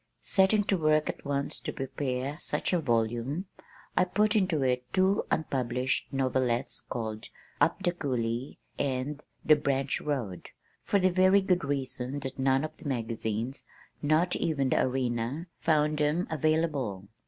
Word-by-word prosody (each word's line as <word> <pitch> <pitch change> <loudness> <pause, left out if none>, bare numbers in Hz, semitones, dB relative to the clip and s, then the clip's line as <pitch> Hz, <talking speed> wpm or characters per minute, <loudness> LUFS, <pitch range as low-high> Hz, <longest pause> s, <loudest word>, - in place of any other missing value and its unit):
Setting 200 +2 +4
to 195 -2 +1
work 155 -1 +3
at - - -5
once 140 0 -2
to - - -4
prepare 135 0 -3
such - - -2
a 180 - +3
volume 120 - 0 0.5
I - - +5
put 210 +4 +2
into 185 -8 +2
it 125 -1 0
two 190 +1 +2
unpublished 130 -4 -1
novelettes 130 -2 0
called 110 -2 -5 0.3
Up 195 - +2
the 175 - +3
Cooley 125 -6 -2 0.2
and 140 +2 -1 0.2
The 155 - +7
Branch 140 -2 0
Road, 120 -12 -3 0.3
for 205 - +2
the 185 0 +3
very 185 +2 +5
good 180 -3 +2
reason 135 -1 -3
that 130 0 -6
none 135 +1 +3
of 155 - -3
the - - -13
magazines, 115 0 -3 0.3
not 155 +4 +2
even 145 -5 0
The - - +3
Arena, 125 +3 -1
found 150 -1 +2
them 150 +4 +2
"available." 150 - 0
140 Hz, 145 wpm, -29 LUFS, 125-160 Hz, 0.5 s, The